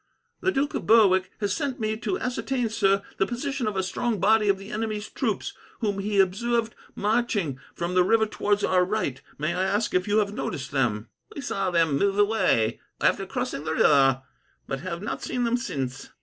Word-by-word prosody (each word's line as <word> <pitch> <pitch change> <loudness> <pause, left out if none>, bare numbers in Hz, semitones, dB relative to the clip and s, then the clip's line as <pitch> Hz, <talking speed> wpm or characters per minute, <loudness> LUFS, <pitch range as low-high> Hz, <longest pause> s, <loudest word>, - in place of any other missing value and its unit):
"The 380 - +1
Duke 285 -2 0
of - - -4
Berwick 195 -4 +5
has 200 -2 0
sent 280 -2 -2
me 215 -1 -1
to 370 +11 -2
ascertain, 255 - -2
sir, 195 -2 +2 0.2
the 195 - +3
position 255 0 -3
of 205 -2 -2
a 190 - +1
strong 215 +4 -1
body 210 +2 +4
of 195 - +3
the 195 +3 -10
enemy's 215 -2 -3
troops, - - -2 0.3
whom 205 -4 -1
he 200 0 0
observed 225 +4 +1 0.2
marching 205 - 0 0.2
from 175 +1 -3
the 180 0 +5
river 220 +4 +3
towards 205 -1 0
our 180 -1 +3
right. 180 -9 -2 0.2
May 155 +3 -1
I 180 - -1
ask 205 +3 0
if 180 +1 +1
you 205 +1 +2
have 205 -1 +1
noticed 160 - -4
them?" 120 -5 0 0.3
"We 285 - -5
saw 195 -7 -1
them 165 -5 +2
move 200 0 +1
away, 205 - +2 0.2
after 195 -1 +1
crossing 250 - -3
the 160 - -2
river, 135 -4 +4 0.4
but 135 - -4
have 170 +2 -5
not 215 - -4
seen 250 -1 -2
them 235 0 +2
since. 135 - -4
205 Hz, 195 wpm, -26 LUFS, 180-225 Hz, 0.4 s, Berwick